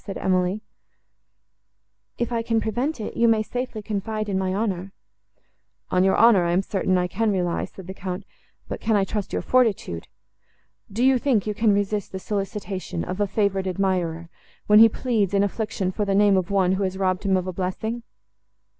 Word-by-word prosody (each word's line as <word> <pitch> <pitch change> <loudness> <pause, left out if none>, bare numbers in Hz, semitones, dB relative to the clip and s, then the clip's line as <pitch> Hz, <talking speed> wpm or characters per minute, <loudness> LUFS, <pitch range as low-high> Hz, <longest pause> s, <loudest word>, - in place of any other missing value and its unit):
said 195 - -6
Emily; 185 +2 0 1.6
"if 240 0 -2
I 230 -1 0
can 230 0 +1
prevent 245 +7 -2
it, 215 - -5
you 235 - +3
may 220 -1 +3
safely 245 -2 -5
confide 215 +1 -3
in 190 -1 0
my 190 -1 -1
honour."—"On 190 -2 -5
your 190 - +3
honour 225 -5 +6
I 170 0 +1
am 185 +2 +2
certain 185 -1 0
I 180 - +1
can 220 +3 0
rely," 180 -3 -1
said 190 - -12
the 190 - -7
Count; 190 0 -5 0.4
"but - - -6
can 220 -1 +1
I 200 - +3
trust 200 +1 -3
your - - -2
fortitude? 215 - +1 0.8
Do 225 +5 -1
you 265 -1 +4
think 240 -7 +1
you 210 - -1
can 220 +1 +2
resist 205 0 -1
the - - -3
solicitation 195 - -4
of 185 - -5
a 205 - +2
favoured 195 -1 0
admirer, 180 -3 -1 0.4
when 210 0 +6
he 225 0 +9
pleads, 215 -5 0
in 200 - +4
affliction, 205 -2 -2
for 210 - -2
the 200 -1 0
name 205 0 +5
of 185 -2 0
one, 190 -2 +2
who 190 +1 0
has 190 0 -2
robbed 185 -1 0
him 195 -2 +2
of 180 - -2
a 185 - -4
blessing?" 205 +6 -3
200 Hz, 190 wpm, -24 LUFS, 185-220 Hz, 1.6 s, he